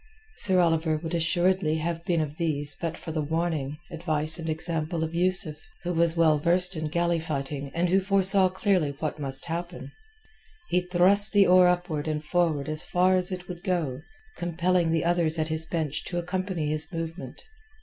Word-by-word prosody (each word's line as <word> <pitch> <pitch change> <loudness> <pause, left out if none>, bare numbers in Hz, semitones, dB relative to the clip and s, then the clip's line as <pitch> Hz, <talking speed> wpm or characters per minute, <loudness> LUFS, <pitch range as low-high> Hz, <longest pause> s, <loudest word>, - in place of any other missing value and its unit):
Sir 185 -2 +3
Oliver 165 -2 +2
would 165 +2 -6
assuredly 175 0 +1
have 165 +1 -3
been 175 -4 +1
of 150 0 -5
these 145 -4 -1
but 165 -1 -3
for 160 - -7
the 155 -1 -2
warning, 155 -2 -2
advice, 160 -1 0
and 165 -1 -5
example 160 +1 -2
of 160 +1 -4
Yusuf, 175 -3 +1 0.3
who 180 0 -2
was 165 0 +2
well 155 -2 +4
versed 180 +3 +5
in 155 -1 -3
galley 170 +2 0
fighting 140 -2 -4
and 175 +1 +1
who 190 +2 +3
foresaw 195 -1 +3
clearly 185 -6 0
what 155 0 -4
must 135 -2 0
happen. 175 +1 -6 0.8
He 180 - +2
thrust 185 +4 +2
the 200 -1 +6
oar 180 0 +6
upward 175 -4 -1
and 155 -1 -2
forward 160 -4 0
as 155 0 +4
far 185 +1 +2
as 185 0 0
it 180 -1 -6
would 175 -1 -8
go, 160 -9 -2 0.4
compelling 175 0 0
the 165 0 0
others 170 -2 +1
at 155 0 -1
his 160 0 0
bench 160 -4 -3
to 175 - -4
accompany 180 -2 -3
his 155 +3 -3
movement. 165 +1 -7
170 Hz, 180 wpm, -26 LUFS, 155-180 Hz, 0.8 s, the